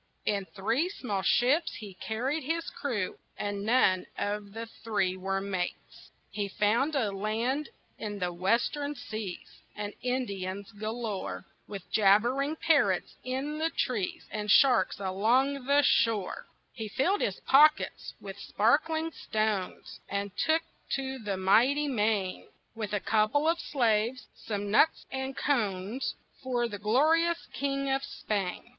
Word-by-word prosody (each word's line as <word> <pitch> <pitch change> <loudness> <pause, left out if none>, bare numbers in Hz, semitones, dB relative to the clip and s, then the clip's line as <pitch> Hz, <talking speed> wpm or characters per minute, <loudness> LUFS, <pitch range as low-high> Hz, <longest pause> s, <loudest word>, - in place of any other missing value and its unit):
In 200 -2 0
three 225 - -1
small 210 - -3
ships 275 - +2
he 205 -3 -8
carried 245 +11 -2
his 330 +4 -2
crew, 230 -10 -3 0.2
And 205 -1 -3
none 205 -5 +3
of 205 0 -3
the 225 +1 -5 0.2
three 185 -5 0
were 195 +1 -2
mates. 190 -3 -5 0.2
He 205 -1 -2
found 230 +10 +1
a 225 -7 +1
land 225 +8 -1 0.3
in 205 -1 -4
the 180 -2 -2
western 240 - 0
seas, 215 -7 -7
And 205 -1 -4
Indians 200 -6 -3
galore, 215 -2 -4 0.2
With 200 -3 -7
jabbering 240 +9 +3
parrots 280 - +2
in 270 +4 -3
the 320 +1 +1
trees, 220 - -2
And 210 0 -3
sharks 245 -6 +5
along 240 +8 +1
the 285 +1 +5
shore. 220 -8 +2 0.3
He 220 -3 -5
filled 350 - +1
his 190 - -1
pockets 305 +3 +4
with 195 0 -8
sparkling 315 +8 +1
stones 215 - -2
And 200 -1 -3
took 320 +1 +2 0.3
to 265 -1 -4
the 205 -4 -3
mighty 245 +10 +4
main, 210 -7 0 0.3
With 215 -3 -5
a 205 - +2
couple 220 +10 +2
of 335 +1 +2
slaves, 235 -3 +1
some 205 -2 -4
nuts 315 +9 +4
and 265 0 -4
cones 215 -3 -1 0.3
For 245 -3 0
the 205 -3 -6
glorious 315 - +3
king 275 0 -1
of 270 0 +1
Spain. 200 -8 -3
225 Hz, 135 wpm, -29 LUFS, 200-275 Hz, 0.3 s, sharks